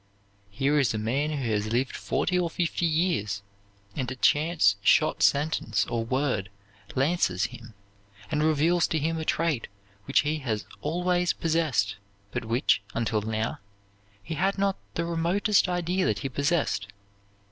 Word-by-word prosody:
"Here 135 +8 +1
is 120 -6 +2
a - - -1
man 130 +8 0
who 135 -7 -2
has 105 0 0
lived 125 +3 0
forty 180 -1 0
or 175 -1 0
fifty 170 0 0
years; 155 - 0 0.5
and 130 -3 -2
a 130 - -5
chance 150 - +3
shot - - +3
sentence 140 - +2
or 115 -1 -2
word 125 -5 -1 0.5
lances 130 - +1
him, 115 -3 -12 0.6
and 150 -1 +1
reveals 160 +3 +3
to 160 - -1
him 160 +2 -1
a 160 - -4
trait 155 -8 0 0.4
which - - +3
he 155 +1 -1
has 110 -6 -3 0.2
always 180 +3 +1
possessed, 155 - 0 0.3
but - - -3
which, 115 -3 +2
until 115 -2 0
now, 110 +1 -2 0.6
he 165 - -5
had 190 +6 0
not 195 0 +1 0.2
the 170 - -1
remotest 175 +4 +2
idea 180 +1 0
that - - 0
he - - 0
possessed. 140 -7 0
145 Hz, 150 wpm, -27 LUFS, 115-170 Hz, 0.6 s, chance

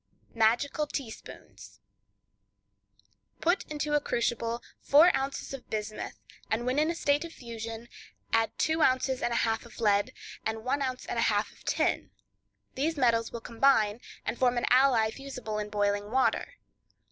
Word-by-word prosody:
Magical 240 +7 +2
Teaspoons.—Put 290 - -8
into 300 0 -2
a 295 - +5
crucible 235 -3 -1 0.2
four 315 +6 +6
ounces 270 +1 -3
of 270 -2 -9
bismuth, 215 0 -4 0.3
and 225 +2 0
when 255 +3 +1
in 310 +2 +2
a 340 - -1
state 290 -2 +1
of 335 - -7
fusion, 230 -3 -7 0.5
add 225 0 +3
two 315 0 +1
ounces 260 -2 +2
and 240 - 0
a - - 0
half 225 -1 +1
of 235 -1 -14
lead, 205 -2 +2 0.3
and 220 0 -3
one 260 +3 0
ounce 255 -1 -2
and 235 - -2
a 230 - +3
half 210 0 0
of - - -20
tin; - - 0 0.6
these 310 +4 -1
metals 230 -3 +2
will 235 - -6
combine, 230 -2 +2 0.2
and - - -3
form 250 -1 +3
an 240 - +1
alloy 250 -4 +5
fusible 250 -5 -5
in 210 0 -4
boiling 205 0 0
water. 260 - +1
240 Hz, 155 wpm, -29 LUFS, 225-275 Hz, 0.6 s, four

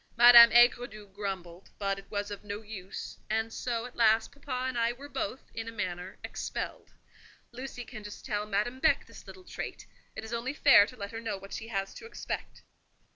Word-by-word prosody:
Madame 235 -1 +10
Aigredoux 240 -3 +4
grumbled, 190 -3 -6
but 195 -1 -1
it 195 - -16
was 205 -1 -3
of 205 - -7
no 205 +1 -6
use; 200 -3 -8
and 220 +1 -1
so, 235 -2 -2
at 250 - -10
last, 220 -1 +4
papa 260 -3 -4
and 260 - -3
I 235 0 +1
were 275 +4 -11
both, 290 -2 -5
in 225 0 -5
a - - -4
manner, 185 -4 -4
expelled. - - -5 0.6
Lucy 250 0 -7
can 215 - -9
just 205 0 -9
tell 210 -3 -2
Madame 215 +5 -1
Beck - - +3
this - - -14
little 375 - -11
trait: - - -7 0.3
it - - -6
is 220 +1 -7
only 245 +4 -2
fair 275 -9 +7
to 250 - -11
let 200 -2 -6
her 225 0 -6
know 215 -3 -3
what 195 +1 -11
she 225 - -5
has 195 -3 -3
to 455 - -10
expect." - - -6
225 Hz, 200 wpm, -30 LUFS, 205-245 Hz, 0.6 s, Madame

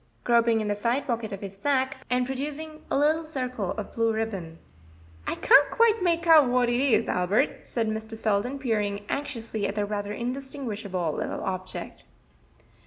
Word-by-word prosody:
groping 235 -2 +3
in 215 - -2
the 205 - +1
side 235 +6 0
pocket 230 -4 -2
of 195 - -6
his 195 -1 -7
sacque, 265 +4 0
and 250 0 +2
producing 300 +4 -5
a - - +1
little 305 +3 +3
circle 255 - -3
of 215 - -6
blue 230 0 +1
ribbon. 200 -7 -3 0.7
"I - - -1
can't 285 - +6
quite 460 -2 +3
make 340 -1 +1
out 315 -6 +7
what 245 -1 +3
it 240 0 +1
is, 275 -3 +3
Albert," 200 +10 +1
said 230 -2 -1
Mr. 220 +1 -4
Selden, 220 +5 0
peering 210 -6 -1
anxiously 230 -7 -3
at 200 - -4
the 205 -1 0
rather 205 0 -3
indistinguishable 230 - -3
little - - -3
object. 185 0 -5
235 Hz, 170 wpm, -26 LUFS, 205-275 Hz, 0.7 s, out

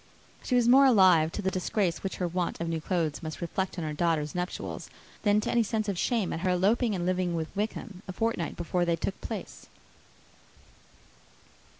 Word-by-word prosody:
She 250 - -1
was 245 -1 +4
more 270 +3 +7
alive 185 -9 +5
to 210 - -4
the 190 - +1
disgrace, 185 -1 -1
which 195 - -3
her 180 - -1
want 175 0 -2
of 170 - -2
new 165 -1 -2
clothes 165 -3 -1
must 155 -2 -6
reflect 185 +2 -3
on 170 - -3
her 155 - -3
daughter's 155 -2 0
nuptials, 180 +1 -4 0.3
than 205 -1 +3
to - - -2
any 235 - +3
sense 215 0 -1
of 200 - -1
shame 220 +1 0
at - - -3
her 185 +2 0
eloping 205 +5 +2
and 175 -1 -2
living 180 -1 0
with 160 -1 -4
Wickham 210 -1 -4
a - - -4
fortnight 225 -3 -1
before 175 +1 0
they 170 -1 +2
took 195 +3 -4
place. - - -7
185 Hz, 195 wpm, -28 LUFS, 170-210 Hz, 0.3 s, more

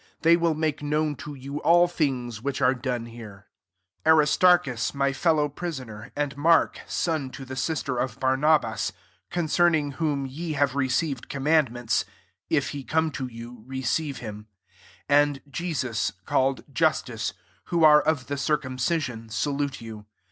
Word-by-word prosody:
They 165 +1 +7
will 170 -2 +1
make 155 -2 -1
known 150 0 0
to 150 -1 -8
you 140 +2 -6
all 175 +1 +5
things 125 -9 -2
which 135 +1 -2
are 130 -1 +4
done 125 -2 -3
here.. 110 -4 -11 0.6
10 160 - +6
Aristarchus 150 -5 +3
my 140 0 +1
fellow 150 +1 +2
prisoner, 135 -9 -7
and 145 -1 -2
Mark 160 +3 +3
son 155 -6 -1
to 135 +1 -9
the 130 +1 -7
sister 135 -2 -2
of 125 -3 -2
Barnabas, 130 -4 +2 0.4
concerning 165 -3 +2
Whom 140 -1 -1
ye 155 +5 -5
have 140 -2 +1
received 135 0 -1
com 135 -1 -5
mandments, 130 -7 +2 0.5
(if - - +1
he 140 -1 -6
come 160 +3 +1
to 135 -2 -4
you 120 0 -10
receive 135 +2 -2
him,) 105 -2 -8 0.6
11 145 +1 +5
and 140 -2 -7
Jesus 130 - -2
called 135 0 +1
Justus, 130 -10 0 0.3
who 170 -2 +1
are 150 -1 +8
of 150 -4 0
the 140 - -3
circumcision, 130 -4 -1
salute 140 +4 -2
you. 110 -2 -9
140 Hz, 150 wpm, -26 LUFS, 125-155 Hz, 0.6 s, are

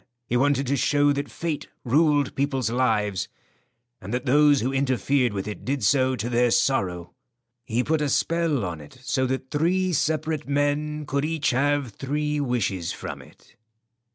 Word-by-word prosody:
He 120 - -2
wanted 140 +2 +2
to 135 +2 0
show 145 +2 +3
that 140 0 -3
fate 160 -3 -4 0.2
ruled 145 +1 +3
people's 135 -4 -1
lives, 105 -7 0 0.7
and 95 - -7
that 125 +2 -2
those 145 +1 +5
who 130 +4 -1
interfered 135 -1 +1
with 100 0 -4
it 105 - -6
did 135 -2 -2
so 130 +4 +3
to 115 -1 -3
their 120 0 +2
sorrow. 90 -10 0 0.5
He 120 +1 0
put 155 +2 0
a 150 - 0
spell 165 -7 +1
on 85 -3 -5
it 75 - -14
so 130 0 0
that 130 0 -4
three 180 +4 +1
separate 155 0 -1
men 145 +1 0
could 140 +1 -1
each 155 -1 0
have 140 0 +1
three 150 +6 -2
wishes 115 - -1
from - - -7
it." - - -20
135 Hz, 165 wpm, -25 LUFS, 120-145 Hz, 0.7 s, those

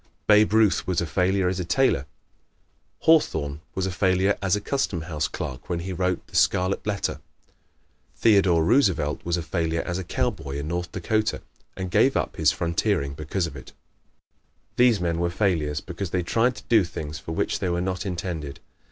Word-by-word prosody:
Babe 105 0 +5
Ruth 110 -2 +3
was 90 -2 +1
a 85 - 0
failure 90 +4 +1
as 90 +1 -1
a - - -1
tailor. 85 - +1 0.9
Hawthorne 75 - +2
was 95 - -1
a 95 - -2
failure 95 +2 +2
as 95 -1 +2
a - - -1
Custom 105 - -1
House 80 -2 -2
clerk 65 +1 -6
when 85 -1 -1
he 95 +2 -4
wrote 90 0 -1
the - - -15
"Scarlet 95 +3 +2
Letter." 100 -1 -2 0.9
Theodore 95 -7 +4
Roosevelt 95 - +2
was 85 0 0
a 85 - -3
failure 80 +1 -1
as 90 0 -3
a - - -4
cowboy 70 -4 -2
in 70 +1 -4
North 90 +1 -3
Dakota 110 +4 -1 0.3
and 95 -1 -4
gave - - +4
up - - -2
his 75 -3 +4
frontiering 85 -1 -1
because 75 +5 -2
of 80 - -7
it. 65 - -11 1.0
These 120 -4 +4
men 85 -1 -1
were 85 0 +1
failures 85 -6 0
because 95 0 -5
they 90 +1 -1
tried 115 +8 +1
to - - -11
do 110 -4 +4
things 75 -4 -6
for 80 - -6
which - - -1
they 90 - -1
were 85 0 0
not 90 0 -2
intended. 85 -6 -4
90 Hz, 185 wpm, -25 LUFS, 80-100 Hz, 1.0 s, Babe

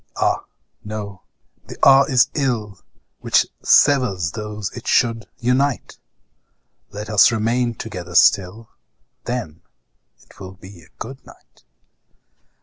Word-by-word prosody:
ah! - - 0 0.4
no; 105 -3 -7 0.5
the - - -10
hour 135 0 +6
is 125 -3 +3
ill 115 - -2 0.4
Which - - +2 0.2
severs 120 - +3
those 105 -1 -6
it 120 - -9
should 115 -4 +1
unite; 130 +2 -1 0.9
Let 105 +1 -8
us 105 +1 +5
remain 115 +2 -1
together 90 -6 -8
still, 100 +5 +2 0.5
Then 115 -11 -5 0.6
it - - -22
will 95 -1 -9
be 95 -1 -15
good 130 +3 -9
night. - - -20
110 Hz, 110 wpm, -20 LUFS, 100-125 Hz, 0.9 s, hour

